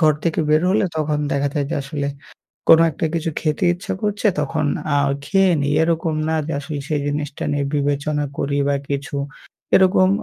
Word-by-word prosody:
ঘর 155 -2 +5
থেকে 165 -1 +1
বের 155 +2 +4
হলে 200 +1 +2
তখন 150 -1 0
দেখা 140 0 +1
যায় 145 -2 0
যে - - -1
আসলে 140 0 -3 0.6
কোনো 165 0 +8
একটা 155 - -2
কিছু 165 -1 -1
খেতে 155 +4 -1
ইচ্ছা 175 +2 -5
করছে, 210 0 0
তখন 150 +1 -1 0.3
আ - - +4 0.3
খেয়ে 195 +4 +3
নেই। 140 +1 0
এরকম 165 0 +1
না 160 - +1
যে - - -3
আসলে 145 0 -5
সেই 150 -2 0
জিনিসটা 145 0 -3
নিয়ে 145 -1 0
বিবেচনা 145 +1 0
করি 140 0 -1
বা 140 - +2
কিছু, 140 0 -3 0.6
এরকম 185 0 +5
150 Hz, 180 wpm, -20 LUFS, 145-165 Hz, 0.6 s, কোনো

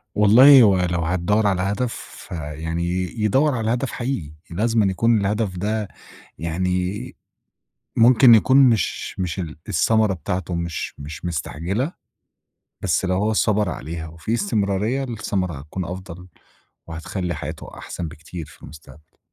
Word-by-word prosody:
والله 125 +6 +8
هو 100 -4 +5
لو 85 - 0
هتدوّر 90 +6 +1
على 95 -2 +1
هدف 105 +5 -1 0.3
فيعني 80 +1 -4 0.4
يدوّر 135 +7 +2
على 115 -1 0
هدف 125 +2 -2
حقيقي، 120 - -4 0.2
لازمًا 110 +5 +1
يكون 110 +3 +2
الهدف 100 -1 -1
ده 105 +3 -2 0.5
يعني 90 +7 -2 0.8
ممكن 120 +1 +7
يكون 130 +5 +4
مش 120 -9 +2
مش 90 0 -2
ال 80 -4 -5
الثمرة 105 +4 +2
بتاعته 90 +1 -3
مش 85 -1 -4
مش 75 +3 -8
مستعجلة، 90 - -2 0.9
بس - - +1
لو 95 0 0
هو 105 +4 +1
صبَر 105 -2 +2
عليها 80 +1 -6
وفي 80 +7 -5
استمرارية 110 - 0
الثمرة 100 -7 -2
هتكون 80 +6 -6
أفضل، 90 0 -8 0.6
وهتخلّي 85 +2 -4
حياته - - -7
أحسن 85 - -6
بكتير 80 +2 -8
في - - -18
المستقبل. 75 0 -15
95 Hz, 130 wpm, -22 LUFS, 85-110 Hz, 0.9 s, والله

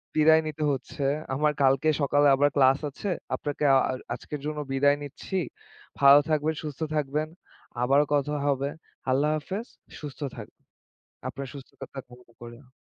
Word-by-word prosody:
বিদায় 160 +1 +6
নিতে 155 0 -4
হচ্ছে। 135 +1 -4 0.3
আমার 150 +3 +2
কালকে 135 +3 +4
সকালে 145 +1 +4
আবার 145 +1 +3
class 135 0 +5
আছে। 195 +8 -5 0.3
আপনাকে 145 0 -4
আ - - +7
আর 130 - -3 0.2
আজকের 145 +4 -7
জন্য 150 0 -3
বিদায় 140 +1 +3
নিচ্ছি। 150 +6 -5 0.6
ভালো 140 +1 +8
থাকবেন, 155 +1 +1
সুস্থ 145 -3 -6 0.2
থাকবেন। 150 +1 -1 0.5
আবারও 140 +4 +4
কথা 145 +1 +1
হবে। 140 0 +1 0.4
আল্লাহ 140 +4 +2
হাফেজ। 195 +9 -5 0.3
সুস্থ 145 -4 -8 0.2
থাকুন। - - -10 0.7
আপনার 140 0 -6
সুস্থতা 135 -2 -10
কামনা 125 -3 -11
করি 120 0 -9
আমি। 125 - -25
145 Hz, 150 wpm, -27 LUFS, 135-150 Hz, 0.7 s, ভালো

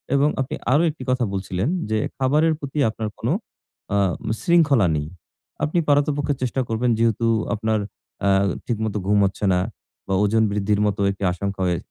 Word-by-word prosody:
এবং 140 +2 +4
আপনি 135 - -3 0.2
আরো 150 +4 +4
একটি 150 -4 -7
কথা 130 -1 +2
বলছিলেন 95 +1 -2 0.2
যে, 110 - +1 0.2
খাবারের 150 +5 +3
প্রতি 140 0 -4
আপনার 110 0 -4
কোন 115 - -3 0.7
আ - - +3 0.4
শৃঙ্খলা 155 - +4
নেই। 75 0 -2 0.6
আপনি 160 +4 +1
পারতপক্ষে 145 0 +2
চেষ্টা 130 +1 0
করবেন 115 +2 +1
যেহেতু 115 0 +1 0.3
আপনার 110 0 0 0.5
আ - - +4 0.4
ঠিকমতো 110 -2 -2
ঘুম 105 +1 +3
হচ্ছে 100 +2 -2
না 90 - +2 0.5
বা - - -1
ওজন 110 +2 +3
বৃদ্ধির 105 0 0
মতো 100 0 -1
একটি 100 - -7
আশঙ্কা 100 +2 -4
হয়ে 90 -1 +1
115 Hz, 160 wpm, -22 LUFS, 100-140 Hz, 0.7 s, এবং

